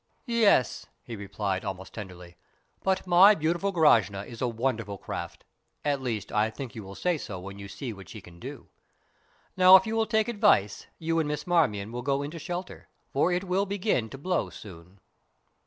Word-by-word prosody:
"Yes," 230 - +2 0.2
he 120 - -7
replied, 100 -1 -3
almost 95 -1 -6
tenderly; 90 -4 -9 0.5
"but 190 0 0
my 185 +4 +7
beautiful 175 +4 0
Grashna 110 - +3
is 115 -2 -10
a 125 - +1
wonderful 115 -4 -2
craft - - -7 0.4
at 140 -2 0
least, 115 -6 -3
I 105 +1 +2
think 125 +2 -8
you 110 - -7
will 95 0 -10
say 175 - 0
so 95 -8 -6
when 100 +2 -9
you 100 - -8
see 105 +5 -6
what 95 -2 -13
she 110 - -8
can 90 -3 -15
do. - - -9 0.9
Now, 185 0 +9
if 190 - +6
you 220 0 -2
will 225 -1 +1
take 220 0 +1
advice, 205 - +2
you 165 0 0
and 155 - 0
Miss 150 0 -3
Marmion 110 - +1
will 120 +1 -4
go 140 +2 0
into 155 +4 -6
shelter, 175 +3 -6 0.3
for 160 +6 +2
it 180 +1 0
will 195 +2 0
begin 195 - 0
to 135 - -9
blow 180 +6 -1
soon." 90 -1 -13
135 Hz, 190 wpm, -27 LUFS, -, 0.9 s, Now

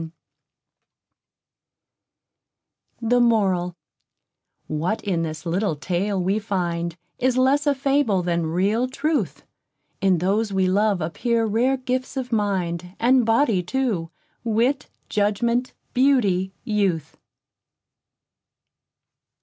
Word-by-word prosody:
The 245 +2 +3
Moral 190 -7 +2 0.9
_What 165 +8 -2
in 180 -5 0
this 155 0 -5
little 175 0 0
Tale 185 +6 -1
we 190 +4 +1
find, 170 -5 -2 0.2
Is 255 0 +1
less 275 +3 +3
a 285 - +3
fable 270 -8 +1
than 170 -2 0
real 200 +9 +1
truth. 300 +4 -2 0.6
In 190 -2 +3
those 200 +5 0
we 190 -1 +2
love 200 0 +2
appear 230 +8 0
rare 240 +5 +2
gifts 255 +1 -3
of 255 -1 -3
mind, 185 -4 -1
And 245 0 +4
body 225 -4 +3
too: 190 -4 -1 0.3
wit, 235 +4 +1 0.2
judgment, 235 +4 0 0.2
beauty, 205 -9 +2
youth. 195 -8 -1
210 Hz, 100 wpm, -23 LUFS, 180-245 Hz, 0.9 s, And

